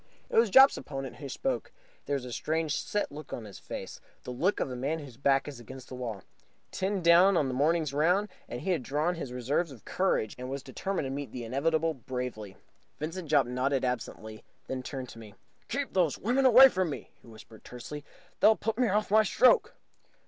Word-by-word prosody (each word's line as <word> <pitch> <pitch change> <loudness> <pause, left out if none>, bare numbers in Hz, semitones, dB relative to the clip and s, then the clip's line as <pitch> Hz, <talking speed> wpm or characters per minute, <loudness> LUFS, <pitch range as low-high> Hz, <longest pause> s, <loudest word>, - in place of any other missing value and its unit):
It - - -3
was 230 -1 +5
Jopp's 265 +6 +7
opponent 135 -3 -6
who 140 +1 -7
spoke. 265 - -3 0.4
There 145 - 0
was 135 -2 -4
a 125 - -7
strange, 160 +1 -1
set 205 -6 -2
look 150 +2 -10
on 115 - -5
his 100 - -11
face - - -8 0.2
the - - -6
look 170 +11 0
of 130 - -2
a - - -4
man 140 +6 -2
whose 140 -6 -10
back 135 +1 +2
is 140 -4 -7
against 130 +2 -11
the - - -9
wall. 115 -6 -5 0.5
Ten 190 -1 -2
down 175 +3 +6
on 145 - +2
the 130 - -3
morning's 150 +2 +1
round, 180 +8 +2 0.2
he 125 +11 -3
had 170 -6 0
drawn 150 +6 -1
on - - 0
his 150 -7 -6
reserves 135 +7 -1
of 120 -6 -14
courage 180 - 0
and 125 0 -6
was 135 0 -5
determined 185 +5 -3
to 135 - -4
meet 140 0 -5
the 125 - -6
inevitable 160 +7 0
bravely. 125 -6 -6 0.4
Vincent 165 +1 -5
Jopp 140 -4 +4
nodded 130 +2 0
absently, 110 -3 -5 0.2
then 130 -1 -4
turned 130 -1 -6
to 115 - -11
me. 105 -3 -12 0.3
"Keep 280 +3 -3
those 175 -6 +2
women 255 +5 +2
away 260 +2 +10
from 185 -8 -1
me," 145 - -7
he - - -19
whispered 110 -1 -14
tensely. 135 +4 -8 0.4
"They'll 220 - +6
put 225 +2 -3
me 250 - +3
off 210 0 0
my 220 +1 +7
stroke!" 230 +4 +3
145 Hz, 210 wpm, -29 LUFS, 125-180 Hz, 0.5 s, away